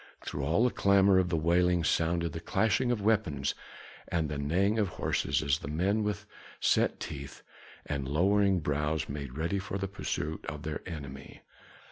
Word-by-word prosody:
Through 70 - -4
all 80 - +2
the 125 - +3
clamor 100 -1 +4
of 90 -1 +1
the 85 - +1
wailing 85 +2 +3
sounded 85 0 +1
the 80 - -4
clashing 110 +7 +1
of 110 -4 -1
weapons 100 -11 +1 0.5
and 80 -3 -1
the 70 -1 -3
neighing 95 +9 +1
of 105 - +2
horses, 70 -5 -1
as 70 -1 +1
the - - -7
men 95 +8 +1
with 105 0 -2 0.3
set - - +2
teeth 70 0 -7 0.4
and 70 -2 -3
lowering 95 +5 +3
brows 75 +1 -1
made 70 -2 -6
ready 85 +5 0
for 95 0 -4
the 95 0 -2
pursuit 80 -4 -4
of 75 +1 -5
their 80 -2 -4
enemy. 70 -5 -8
85 Hz, 170 wpm, -30 LUFS, 75-100 Hz, 0.5 s, clamor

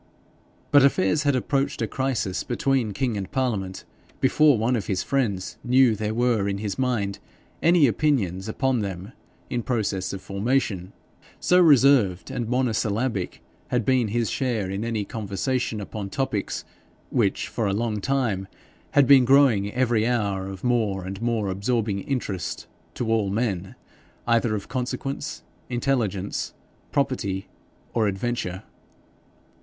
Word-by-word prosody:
But 145 -1 +7
affairs 135 -1 +3
had 140 - +3
approached 140 +2 0
a 115 - +1
crisis 115 -5 -2
between 125 -2 0
king 125 +2 -1
and 95 -2 -5
parliament 105 -8 -2 0.3
before 145 0 +4
one 115 +4 +1
of 110 - -3
his 95 -3 0
friends 100 -10 -1
knew 125 0 +5
that 110 0 -3
there 105 +1 -1
were 115 -4 +2
in 100 - -2
his 100 +1 -4
mind 115 -7 0 0.4
any 170 -2 +5
opinions 110 - 0
upon 130 +2 +1
them 95 0 -5 0.4
in 120 - 0
process 105 -6 -1
of 95 - -5
formation 100 -2 -1 0.5
so 180 - +4
reserved 135 - +5
and 115 -2 -3
monosyllabic 115 -4 -1 0.2
had 120 -3 0
been 130 -2 +3
his 115 +2 -1
share 115 -6 -1
in 100 +2 -3
any 115 -3 -2
conversation 110 +3 -2
upon 100 0 -6
topics 120 -3 -2 0.5
which - - +1
had - - -12
for 110 - 0
a - - +1
long 105 0 -1
time 115 -7 0 0.6
been 135 -1 +7
growing 120 -6 +4
every 120 -3 +1
hour 100 -6 0
of 95 -1 -8
more 110 -6 0
and 95 +3 -6
more 115 -3 0
absorbing 100 +1 -1
interest 100 -5 -3 0.3
to 120 - -2
all 105 -3 +1
men 95 -3 -2 0.5
either 115 -2 +2
of 100 - -5
consequence, 130 +2 -4 0.3
intelligence, 120 -6 -1 0.4
property, 110 -9 -1 0.5
or 110 -2 +2
adventure. 100 -2 -2
115 Hz, 140 wpm, -25 LUFS, 100-130 Hz, 0.6 s, But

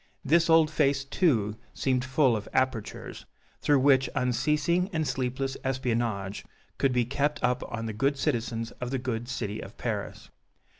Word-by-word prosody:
This 165 +4 +4
old 160 -1 +5
face, 140 -3 +2
too, 115 - +1 0.2
seemed 130 -2 +1
full 130 -1 +3
of 105 -1 -5
apertures, 130 -5 -2 0.3
through 145 -2 +3
which 135 -2 +4
unceasing 150 +8 +1
and 160 -4 -1
sleepless 130 +1 -2
espionage 115 -6 -1 0.4
could 135 - +3
be 125 -1 +2
kept 145 +4 0
up 125 0 +2
on 115 -1 -3
the 110 - -3
good 135 +6 +1
citizens 115 -3 -1
of 125 - -2
the 135 - -1
good 120 -2 -3
City 110 -3 -3
of - - -10
Paris. - - -4
130 Hz, 155 wpm, -28 LUFS, 120-140 Hz, 0.4 s, old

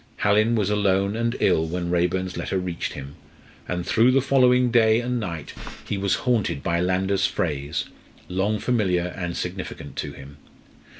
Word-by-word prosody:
Hallin 110 +3 +3
was 105 -2 +1
alone 100 -1 +1
and 115 +1 -1
ill 80 0 +2
when 85 +1 -3
Raeburn's 90 +1 0
letter 95 - -2
reached 90 -2 -3
him, 70 +1 -9 0.5
and 90 -1 -3
through 115 +3 +4
the 130 +1 +4
following 125 -2 +3
day 110 -1 +4
and 125 0 -1
night 85 -8 -5 0.3
he - - -1
was 100 -1 +1
haunted 110 - +1
by 85 0 0
Landor's 95 +2 +1
phrase, 75 -2 -2 0.4
long 95 +4 0
familiar 95 -8 0
and 90 -2 -4
significant 90 +1 -6
to 75 -2 -4
him. 70 +1 -12
95 Hz, 160 wpm, -24 LUFS, 85-110 Hz, 0.5 s, through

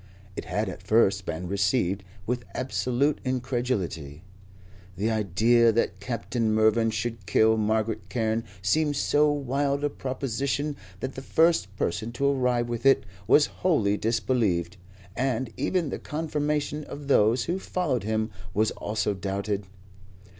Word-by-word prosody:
It - - -5
had - - -1
at - - -6
first 100 -4 +2
been 90 +3 -3
received 100 0 +1 0.2
with 120 +1 -2
absolute 130 +2 0
incredulity. 120 - -2 0.7
The 110 +4 0
idea 115 +3 +3
that 115 +1 0
Captain 115 -1 -2
Mervyn 110 +1 +3
should 115 -4 -4
kill 110 0 +4
Margaret 110 -2 -1
Carne 115 -1 0 0.2
seemed 150 - +2
so 150 +1 +3
wild 140 0 -1
a 145 - +1
proposition 135 +3 -2 0.3
that 130 0 -3
the 135 - -7
first 160 - +2
person 100 +7 -2
to 140 +3 -1
arrive 125 -3 +1
with 120 -1 -4
it 135 -4 +5 0.2
was 150 - +6 0.2
wholly 115 - +3
disbelieved, 110 -6 0 0.4
and 130 -2 -1
even 175 -5 0
the - - -4
confirmation 150 -1 -2
of 145 0 -8
those 115 -2 +4
who 175 +3 -2
followed 165 - -1
him 110 +1 -1 0.2
was 110 +2 +2
also 105 -1 -2
doubted. 100 +1 -3
115 Hz, 135 wpm, -26 LUFS, 105-140 Hz, 0.7 s, was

